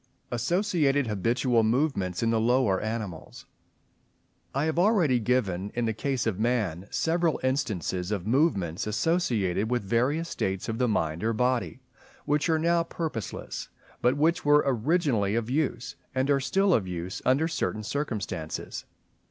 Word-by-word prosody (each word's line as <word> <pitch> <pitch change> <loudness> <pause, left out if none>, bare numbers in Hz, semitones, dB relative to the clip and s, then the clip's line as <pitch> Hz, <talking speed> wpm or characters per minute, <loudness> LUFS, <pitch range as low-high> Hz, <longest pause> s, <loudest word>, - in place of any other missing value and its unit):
Associated 145 - +1
habitual 115 +3 +1
movements 110 - 0
in 115 - +2
the 115 - +2
lower 115 -4 +2
animals.—I 110 - -8
have 160 +1 0
already 175 - +3
given 105 -5 0
in 120 -1 0
the 110 - 0
case 130 +2 -2
of 110 -4 -1
Man 105 -6 0
several 165 0 +1
instances 105 - -1
of 100 -4 -2
movements 110 - +1
associated 110 - 0
with 125 -3 0
various 125 +11 +1
states 95 - -2
of 115 +1 -3
the 125 - +2
mind 80 -5 -1
or 115 +1 +1
body, 125 +2 0 0.4
which 150 +3 +1
are 160 - +3
now 170 +2 +2
purposeless, 160 - -5 0.3
but 125 +3 +3
which 165 +4 +2
were 145 0 +5
originally 130 - +1
of 115 +1 -1
use, 130 -4 -1 0.2
and 130 +2 +1
are 140 - +3
still 190 +9 +2
of 100 - +1
use 90 +1 -5
under 140 +5 +3
certain 135 -9 -2
circumstances. 105 - -4
120 Hz, 145 wpm, -27 LUFS, 105-145 Hz, 0.4 s, were